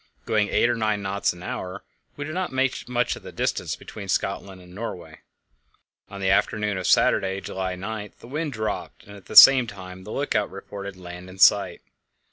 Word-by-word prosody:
Going 105 Hz, -2 st, +1 dB
eight -, -, +3 dB
or 120 Hz, -, +2 dB
nine 110 Hz, -2 st, -1 dB
knots 100 Hz, +1 st, 0 dB
an 90 Hz, 0 st, -11 dB
hour, 95 Hz, +2 st, -5 dB, 0.3 s
we 145 Hz, -, -4 dB
did 155 Hz, -, -6 dB
not 185 Hz, +1 st, -2 dB
make 130 Hz, -1 st, -1 dB
much 125 Hz, -1 st, 0 dB
of -, -, -11 dB
the -, -, -10 dB
distance -, -, -2 dB
between 100 Hz, -2 st, -10 dB
Scotland 95 Hz, 0 st, -2 dB
and 90 Hz, 0 st, -15 dB
Norway. 90 Hz, -7 st, -7 dB, 0.9 s
On 100 Hz, -, -8 dB
the 95 Hz, -1 st, +1 dB
afternoon 105 Hz, 0 st, +1 dB
of 90 Hz, -, -3 dB
Saturday, 95 Hz, 0 st, +3 dB
July 95 Hz, -1 st, -4 dB
9, 105 Hz, +2 st, -6 dB
the -, -, -14 dB
wind 150 Hz, +3 st, -3 dB
dropped, 110 Hz, -2 st, -4 dB
and 100 Hz, -, -13 dB
at 100 Hz, -, -15 dB
the -, -, -8 dB
same 130 Hz, -3 st, +10 dB
time 95 Hz, -3 st, -9 dB
the 105 Hz, -, -9 dB
lookout 115 Hz, -7 st, 0 dB
reported 100 Hz, 0 st, -8 dB
land 90 Hz, 0 st, -10 dB
in 95 Hz, -, -12 dB
sight. 100 Hz, +1 st, +4 dB
100 Hz, 195 wpm, -24 LUFS, 95-110 Hz, 0.9 s, same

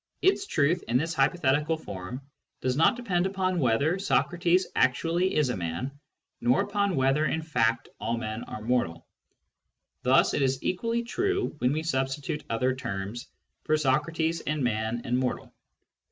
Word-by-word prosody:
Its 390 Hz, +1 st, +3 dB
truth, 155 Hz, +5 st, +2 dB
in 120 Hz, +2 st, +3 dB
this 165 Hz, +5 st, -1 dB
hypothetical 150 Hz, +1 st, +2 dB
form, 105 Hz, +1 st, -7 dB, 0.4 s
does 130 Hz, -1 st, 0 dB
not 160 Hz, -, +4 dB
depend 190 Hz, -7 st, 0 dB
upon 185 Hz, -2 st, -1 dB
whether 140 Hz, +7 st, +2 dB
Socrates 175 Hz, -1 st, +2 dB
actually 175 Hz, +3 st, +2 dB
is 150 Hz, -4 st, +2 dB
a 125 Hz, -, -1 dB
man, 85 Hz, +8 st, -3 dB, 0.5 s
nor 125 Hz, +8 st, +3 dB
upon 200 Hz, -2 st, 0 dB
whether 135 Hz, +3 st, +2 dB
in 160 Hz, +4 st, -1 dB
fact 115 Hz, -7 st, +1 dB
aU 115 Hz, +2 st, -1 dB
men 110 Hz, -1 st, -4 dB
are 110 Hz, -, -7 dB
mortal; 110 Hz, -9 st, 0 dB, 1.0 s
thus 130 Hz, +2 st, +4 dB
it -, -, 0 dB
is 130 Hz, -1 st, 0 dB
equally 230 Hz, +5 st, -1 dB
true 390 Hz, +10 st, -1 dB
when 125 Hz, +1 st, +2 dB
we 155 Hz, +2 st, -1 dB
substitute 135 Hz, -1 st, -2 dB
other 125 Hz, +3 st, +1 dB
terms 105 Hz, -1 st, -5 dB, 0.4 s
for 155 Hz, -, +2 dB
Socrates 160 Hz, +4 st, 0 dB
and 150 Hz, -2 st, -2 dB
man 110 Hz, 0 st, -1 dB
and 125 Hz, 0 st, +1 dB
mortal. 130 Hz, -1 st, -3 dB
140 Hz, 155 wpm, -27 LUFS, 125-175 Hz, 1.0 s, not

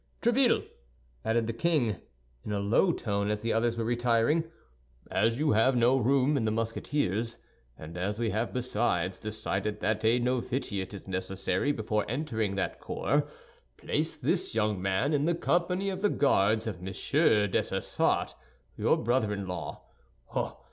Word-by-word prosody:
Tréville," 245 Hz, +1 st, +3 dB, 0.6 s
added 115 Hz, 0 st, +1 dB
the 115 Hz, -, -2 dB
king, 120 Hz, -, +1 dB, 0.5 s
in -, -, -5 dB
a 100 Hz, -, 0 dB
low 110 Hz, -, +3 dB
voice, 100 Hz, -8 st, -1 dB
as 105 Hz, 0 st, -2 dB
the 115 Hz, -, +1 dB
others 115 Hz, +1 st, +1 dB
were 115 Hz, -, -1 dB
retiring, 120 Hz, +6 st, +2 dB, 0.7 s
"as 115 Hz, +1 st, +2 dB
you 150 Hz, +1 st, +2 dB
have 115 Hz, +5 st, +4 dB
no 120 Hz, +2 st, +4 dB
room 135 Hz, +3 st, +3 dB
in 135 Hz, -, +1 dB
the 110 Hz, -, +1 dB
Musketeers, 115 Hz, 0 st, -1 dB, 0.4 s
and 80 Hz, +2 st, -9 dB
as 95 Hz, +4 st, -2 dB
we 115 Hz, -2 st, 0 dB
have 110 Hz, +3 st, -1 dB
besides 105 Hz, -7 st, 0 dB
decided 105 Hz, -1 st, -3 dB
that 110 Hz, 0 st, 0 dB
a 115 Hz, +2 st, +4 dB
novitiate 120 Hz, -5 st, -2 dB
is 100 Hz, -, -10 dB
necessary 95 Hz, +6 st, -1 dB
before 110 Hz, -5 st, -1 dB
entering 110 Hz, -7 st, -1 dB
that 100 Hz, -, -2 dB
corps, -, -, 0 dB, 0.5 s
place -, -, -1 dB
this -, -, -1 dB
young 105 Hz, -4 st, +1 dB
man 95 Hz, +10 st, +1 dB
in 145 Hz, 0 st, +2 dB
the 170 Hz, +1 st, +2 dB
company 180 Hz, +3 st, 0 dB
of 190 Hz, 0 st, -5 dB
the 205 Hz, -, +3 dB
Guards 110 Hz, -, +2 dB
of 100 Hz, -6 st, -5 dB
Monsieur 105 Hz, -, +2 dB
Dessessart, -, -, 0 dB, 0.4 s
your -, -, +2 dB
brother 115 Hz, -2 st, +1 dB
in 100 Hz, -1 st, -3 dB
law. 90 Hz, -1 st, -6 dB
115 Hz, 155 wpm, -29 LUFS, 105-130 Hz, 0.7 s, have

